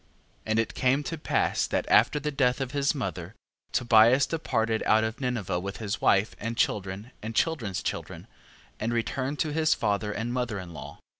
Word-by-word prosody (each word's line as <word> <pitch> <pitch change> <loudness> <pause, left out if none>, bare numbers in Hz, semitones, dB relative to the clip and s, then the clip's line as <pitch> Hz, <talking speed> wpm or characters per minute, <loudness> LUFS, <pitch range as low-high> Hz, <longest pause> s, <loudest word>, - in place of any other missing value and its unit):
14:14. - - -35 0.4
And 110 0 +1
it 115 +1 -1
came 135 +2 +1
to 165 - -4
pass - - +1
that - - -1
after 150 - +4
the 150 +1 -2
death 125 -3 +1
of 135 -2 -3
his 140 +1 +1
mother, 95 - -5 0.4
Tobias 120 +2 +5
departed 115 -8 -1
out 110 +1 +4
of 110 +1 -2
Ninive 110 -9 -2
with 100 +1 -5
his 105 -3 -4
wife, 100 +2 +3
and 115 +2 -4
children, 100 +3 -1
and 110 +1 -6
children's 115 - 0
children, - - -5 0.5
and 110 +2 -1
returned 130 +4 -2
to 155 -1 -1
his 160 0 +3
father 105 +1 -1
and 115 +3 -3
mother 125 -4 -2
in 90 -3 -8
law. - - -9
115 Hz, 190 wpm, -27 LUFS, 105-135 Hz, 0.5 s, Tobias